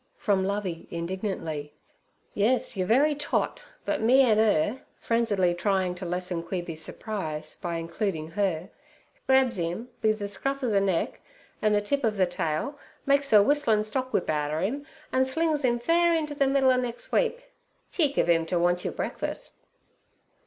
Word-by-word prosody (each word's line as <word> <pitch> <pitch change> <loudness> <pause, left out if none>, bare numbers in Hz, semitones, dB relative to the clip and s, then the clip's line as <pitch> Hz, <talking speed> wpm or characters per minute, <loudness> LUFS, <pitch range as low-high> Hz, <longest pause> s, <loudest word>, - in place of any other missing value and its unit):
from 200 -3 +1
Lovey 190 -4 -3
indignantly. 170 -4 -4 0.6
'Yes, 225 +5 +1
your 185 -2 -1
very 280 +8 +4
tot; 295 - -1 0.2
but - - -1
me 255 +5 +6
an' 220 -4 +4
'er' 215 +2 +2 0.2
frenziedly 205 -6 +1
trying 185 0 0
to 180 0 -7
lessen 180 0 -2
Queeby's 170 -2 -4
surprise 160 -7 -4
by 170 -1 -4
including 165 -1 -3
her, 185 -3 -1 0.6
'grabs 265 -6 +3
'im 175 +9 -3
be 220 - +4
ther 210 -1 -3
scruff 270 +8 -3
ov 245 - +1
ther 200 - +4
neck 190 -4 -1 0.4
an' 215 -1 +3
ther 205 - +3
tip 275 +7 -1
ov 220 -2 +1
ther 185 - +4
tail, 175 - -3 0.3
makes 280 0 +2
er 210 -2 +8
whistlin' 230 -5 +2
stock 255 +4 -3
whip 180 - 0
outer 150 +1 -1
'im, 280 +9 -2 0.3
an' 260 - +4
slings 300 +2 0
'im 240 -2 +2
fair 335 +7 +3
inter 305 -2 -1
ther 280 -1 +2
middle 270 -1 +4
ov 255 0 +2
nex' 240 -2 -6
week. - - 0 0.4
Cheek 295 -5 +1
ov - - +3
'im 165 -1 +3
ter 175 - 0
want 175 +1 +2
your - - -3
breakfuss.' - - -4
210 Hz, 170 wpm, -27 LUFS, 175-265 Hz, 0.6 s, er